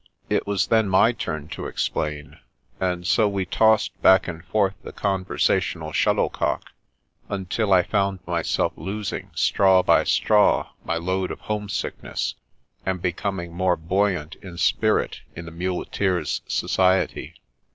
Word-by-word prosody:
It - - +1
was 100 -2 +1
then 110 -3 +2
my 95 +5 +5
turn 80 -10 -5
to - - -5
explain; 75 -1 -3 0.4
and 90 -1 -1
so 105 +3 +3
we 100 -2 -2
tossed 110 +2 +2
back 95 0 +6
and 85 -2 -6
forth 95 +2 +1
the - - -9
con 95 -2 -1
versational - - 0
shuttlecock, - - 0 0.6
until 100 +2 -2
I 90 -1 +6
found 100 +2 0
myself 85 -1 0
losing 100 +1 -5
straw 95 -2 +4
by - - +4
straw 105 -1 +3
my 85 - -2
load 95 +2 -1
of - - -7
homesickness, 105 -2 -3 0.5
and 95 -1 -2
be 90 0 0
coming 85 -2 -4
more 90 0 +2
buoyant 90 -1 -1
of 90 -3 -9
spirit 110 +4 +1
in 85 - -7
the 80 - -9
muleteer's 90 0 -1
society. 95 0 +1
95 Hz, 140 wpm, -23 LUFS, 85-100 Hz, 0.6 s, back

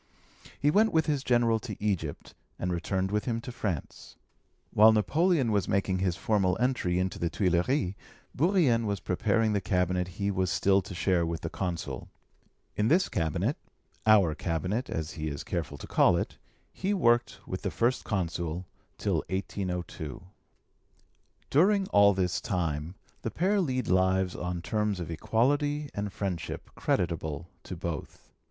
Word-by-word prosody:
He 145 - +3
went 220 +6 +4
with 160 -1 +3
his 145 -3 0
General 120 -3 +3
to 110 -3 -6
Egypt, 95 -8 -2 0.2
and 90 0 -2
returned 95 +2 -1
with 105 0 0
him 115 -2 -1
to 125 - -7
France. 100 - -5 0.6
While 110 +2 +8
Napoleon 145 - +2
was 100 -3 +1
making 95 -1 +1
his 90 -2 +1
formal 95 -2 +1
entry 120 -8 +1
into 95 +1 -1
the 85 - 0
Tuilleries, 90 - +1 0.4
Bourrienne 145 - +3
was 100 -1 -1
preparing 110 +4 +1
the 100 - +1
cabinet 90 -1 0
he 100 0 0
was 95 -2 0
still 95 +1 +3
to 95 0 -9
share 90 -1 +2
with 85 0 -3
the - - -4
Consul. 80 -8 -4 0.7
In 105 - +1
this 175 +8 +3
cabinet 80 -4 0 0.5
our 100 -7 +6
cabinet, 90 +9 -2
as 80 0 -3
he 80 -1 -4
is 70 -2 -4
careful 75 -4 -3
to - - -8
call - - +4
it - - -4 0.3
he 195 +2 -1
worked 120 -8 +2
with - - -5
the - - -1
First 120 +2 0
Consul 85 -3 -2 0.3
till - - 0
1802. 90 -5 -4 1.3
During 195 +7 +4
all 100 -1 +6
this 90 -2 0
time 85 -2 -2 0.3
the - - -2
pair 195 - +1
lead 130 -6 -1
lives 95 0 +2
on 90 -1 -4
terms 105 0 0
of 85 -1 -5
equality 145 - +1
and 100 0 -3
friendship 90 -6 -4
creditable 85 -2 -1 0.2
to 90 - -6
both. 85 -3 -6
95 Hz, 155 wpm, -29 LUFS, 90-120 Hz, 1.3 s, While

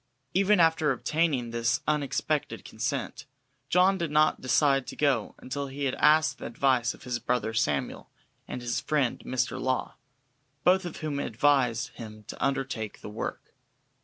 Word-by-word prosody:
Even 195 +1 +4
after 160 -2 +4
obtaining 135 -3 0
this 115 +1 0
unexpected 150 -2 -1
consent, - - -4 0.4
John 190 +2 +4
did 170 -2 -1
not 155 +1 +3
decide 135 +1 +2
to - - -7
go 135 -7 +1
until 140 +2 -4
he 135 +1 -6
had 130 - 0
asked 155 +1 +4
the - - -5
advice 125 -1 +1
of - - -17
his 125 -1 -3
brother 120 -3 -1
Samuel 75 -10 -1 0.4
and 125 - -6
his 120 0 -1
friend 145 -5 0
Mr. 130 0 -2
Law, 130 -1 -1 0.7
both 185 +1 +4
of 175 - -6
whom 150 -2 -2
advised 125 -2 +2
him 110 -2 -10
to - - -5
undertake 135 -6 -2
the - - -7
work. 105 - -6
135 Hz, 155 wpm, -28 LUFS, 120-155 Hz, 0.7 s, Even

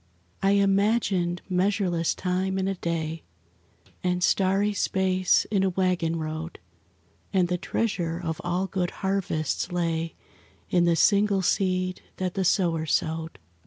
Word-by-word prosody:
I 195 +1 +3
imagined 195 -3 +2
measureless 185 -3 +1
time 185 +1 -1
in 190 0 0
a 195 - 0
day, 165 -3 -3 0.8
And 180 0 0
starry 195 +3 +2
space 185 -2 +2
in 200 -3 +2
a 190 - +2
waggon 180 -3 0
road, 160 +1 -5 0.7
And 185 -2 +2
the 180 -1 -1
treasure 175 -4 -1
of 160 -3 -4
all 175 +2 0
good 185 -2 -1 0.2
harvests 180 -4 -1
lay 165 -2 -1 0.6
In 175 -1 +4
the 170 -1 +3
single 200 +1 +3
seed 185 0 0 0.2
that 185 -1 -2
the 195 - -1
sower 170 -4 +1
sowed. 160 -2 -1
180 Hz, 130 wpm, -26 LUFS, 170-195 Hz, 0.8 s, In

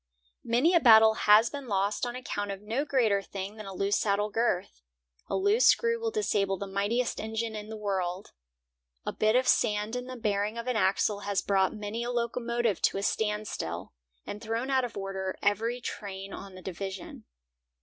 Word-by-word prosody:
Many 245 +9 +3
a 345 - +6
battle 220 -5 +7
has 215 +1 +5
been 280 -3 -6
lost 200 +2 0
on 240 - -5
account 205 -5 -4
of 195 -1 -4
no 235 +7 -1
greater 225 -9 +2
thing 195 +2 -7
than 215 -2 -8
a - - -6
loose 200 +2 +1
saddle 205 0 0
girth. 190 - -1 0.5
A - - -2
loose 405 +5 +4
screw 465 0 +3
will 455 0 -1
disable 205 - 0
the 200 - -4
mightiest 205 +5 -1
engine 220 +1 -3
in 210 0 -7
the 220 - -6
world. 190 -3 -3 0.7
A - - -2
bit 215 +1 +2
of 255 0 +3
sand 210 +2 +2
in 250 0 -3
the 255 0 -7
bearing 210 -1 -1
of 235 - -4
an 250 -1 -1
axle 200 0 +2
has 200 -1 -1
brought 195 0 +2
many 210 +2 -4
a 240 - -3
locomotive 235 -3 -1
to - - +2
a 195 - -3
standstill, 210 - -2 0.3
and 205 - -6
thrown 230 +4 -2
out 260 -1 +3
of 240 -4 -5
order 190 -1 -3
every 225 +4 +1
train 195 -4 -6
on 195 -1 -9
the 185 - -11
division. 190 0 -6
215 Hz, 190 wpm, -29 LUFS, 200-240 Hz, 0.7 s, battle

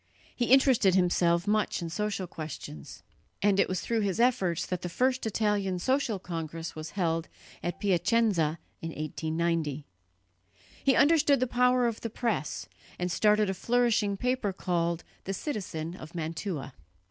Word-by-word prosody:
He 245 - 0
interested 250 -7 +5
himself 175 -1 +3
much 210 +1 +1
in 170 -1 -5
social 210 0 -2
questions; 155 - -8 0.4
and 200 -1 +4
it - - +3
was 185 -1 -1
through 230 -1 0
his 200 0 -1
efforts 230 -9 +2
that 180 -1 -3
the 180 - -4
first 255 +5 +1
Italian 205 -3 0
social 255 +2 +1
congress 165 -2 -5
was 155 +5 -8
held 165 -3 0 0.3
at 175 +2 -3
Piacenza 195 -4 +2 0.2
in 165 - -4
1890. 155 -1 -2 1.0
He 270 -2 +4
understood 290 -2 +5
the 255 - +2
power 250 0 +3
of 230 -2 -1
the 230 - -3
press, 225 - -2 0.3
and 180 0 -2
started 210 +3 +3
a 190 - 0
flourishing 230 -1 +1
paper 250 -3 0
called 170 -2 -1 0.2
the 195 - -2
Citizen 180 - -4
of 155 -1 -11
Mantua. 160 -3 -4
190 Hz, 145 wpm, -29 LUFS, 170-230 Hz, 1.0 s, interested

